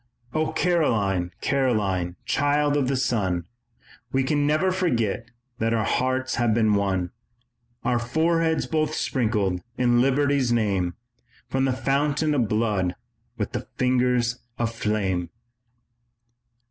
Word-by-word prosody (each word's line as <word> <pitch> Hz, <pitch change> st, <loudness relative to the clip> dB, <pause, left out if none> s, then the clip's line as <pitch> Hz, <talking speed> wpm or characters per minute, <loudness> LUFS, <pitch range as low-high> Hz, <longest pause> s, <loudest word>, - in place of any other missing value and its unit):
"O 155 Hz, 0 st, 0 dB
Caroline, 105 Hz, -, +1 dB
Caroline, 105 Hz, -10 st, 0 dB
child 145 Hz, 0 st, +2 dB
of 140 Hz, -3 st, +1 dB
the 135 Hz, -, +1 dB
sun, 100 Hz, -9 st, 0 dB, 0.7 s
We 135 Hz, 0 st, +2 dB
can 145 Hz, +2 st, +1 dB
never 155 Hz, +5 st, +2 dB
forget 120 Hz, -, 0 dB, 0.3 s
that 115 Hz, +1 st, +1 dB
our 110 Hz, -, +1 dB
hearts 130 Hz, +2 st, 0 dB
have 120 Hz, -3 st, +2 dB
been 110 Hz, -2 st, +3 dB
one, 95 Hz, -3 st, 0 dB, 0.7 s
Our 120 Hz, -1 st, +1 dB
foreheads 160 Hz, +6 st, +1 dB
both 155 Hz, -1 st, 0 dB
sprinkled 105 Hz, -8 st, 0 dB, 0.2 s
in 120 Hz, -1 st, +3 dB
Liberty's 135 Hz, -1 st, +2 dB
name 100 Hz, -6 st, +1 dB, 0.5 s
From 135 Hz, 0 st, +1 dB
the 135 Hz, -, +2 dB
fountain 145 Hz, +3 st, +1 dB
of 120 Hz, -7 st, +1 dB
blood 105 Hz, -5 st, 0 dB, 0.4 s
with -, -, -2 dB
the -, -, -5 dB
fingers 125 Hz, -1 st, +2 dB, 0.2 s
of 115 Hz, -1 st, -1 dB
flame." 95 Hz, -6 st, -1 dB
125 Hz, 120 wpm, -24 LUFS, 105-140 Hz, 0.7 s, been